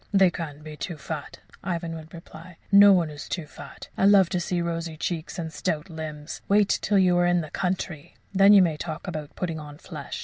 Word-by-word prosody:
"They 195 -3 +5
can't 150 -3 -7
be 155 -1 -8
too 160 +3 -5
fat," 150 0 -7 0.2
Ivan 170 -2 -3
would 160 0 -10
reply. 165 0 -12
"No 200 0 +9
one 175 -5 +3
is 145 0 -9
too 170 -4 -3
fat. - - -12
I - - +2
love 195 -3 +6
to 180 - -1
see 175 0 -1
rosy 165 -1 -3
cheeks 165 +1 -4
and 160 -2 -5
stout 155 +3 -3
limbs. 155 -1 -7
Wait 205 0 +4
till 205 - +2
you're 175 -2 +4
in 175 0 +3
the 155 -2 -8
country! 180 -5 -3 0.2
Then 195 +1 +6
you 200 -2 +8
may 160 -4 0
talk 160 +3 -6
about 155 -4 -6
putting 165 -3 -3
on 145 -1 -10
flesh. - - -7
170 Hz, 210 wpm, -25 LUFS, 155-185 Hz, 0.2 s, No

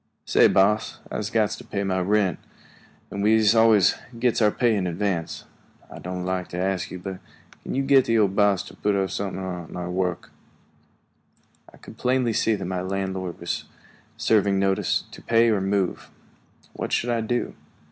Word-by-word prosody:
"Say, - - +5
boss, 105 +3 +2
I'se 105 0 -3
got 110 -3 +1
to - - -6
pay 100 -1 -3
my 95 -1 0
rent, 95 0 +1 0.7
and 100 - -4
we'se 110 0 +4
always 110 -4 +5 0.2
gits 120 0 +1
our 105 - +5
pay 115 +1 +1
in 95 -3 -1
advance. 90 -1 -2 0.5
I - - -9
doan' 90 0 -5
like 95 -1 -2
to 90 - -7
ask 95 0 -1
you, 90 - -7
but 95 +1 -7 0.4
can't - - -4
you 135 - +1
git 135 -1 +5
the 115 - +2
old 100 -3 +2
boss 100 -3 +3
to - - -13
put 105 -1 0
up 95 -1 0
somethin' 95 -1 -4
on 90 -3 -6
your 90 0 -4
work?" 90 -1 -2 1.4
I - - -18
could 110 - -14
plainly 125 -2 +1
see 110 0 +2
that 95 - -5
my 90 0 -2
landlord 95 -1 -3
was - - -3 0.5
serving 105 -4 +2
notice 95 0 +1
to - - -11
pay 115 0 +3
or 100 -3 +1
move. 95 -1 -1 0.6
What - - -5
should 120 - 0
I 115 -1 0
do? 120 +2 -2
100 Hz, 180 wpm, -24 LUFS, 95-110 Hz, 1.4 s, Say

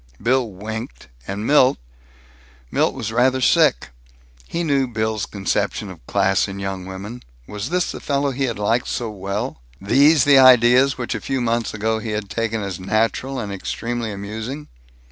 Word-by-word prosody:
Bill 125 +1 +1
winked, 110 - -7 0.2
and 100 +2 -4
Milt 135 -2 +4 0.9
Milt - - +1
was 110 - -4
rather 125 +3 +2
sick. 65 - +3 0.6
He 170 - -2
knew 140 -4 +1
Bill's 110 -2 -2
conception 95 -3 -2
of - - -14
class 95 -1 +2
in 100 0 -7
young 95 -1 -5
women. 100 +6 -7 0.2
Was 105 - -5
this 180 0 0
the - - -7
fellow 140 -1 0
he 135 +1 -1
had 115 -4 -3
liked 115 +4 0
so 115 -3 -3
well? 100 -8 -4 0.2
These 140 +8 +4
the 140 -1 +6
ideas 130 +1 +6
which 125 -2 -3
a - - -4
few 135 -1 -2
months 115 -2 -1
ago 110 +1 -1
he 110 0 -4
had 105 -2 -4
taken 115 -1 -2
as 95 -2 -5
natural 115 +7 -1
and 105 -5 -4
extremely 115 +3 -4
amusing? 110 +8 -6
115 Hz, 165 wpm, -21 LUFS, 100-130 Hz, 0.9 s, the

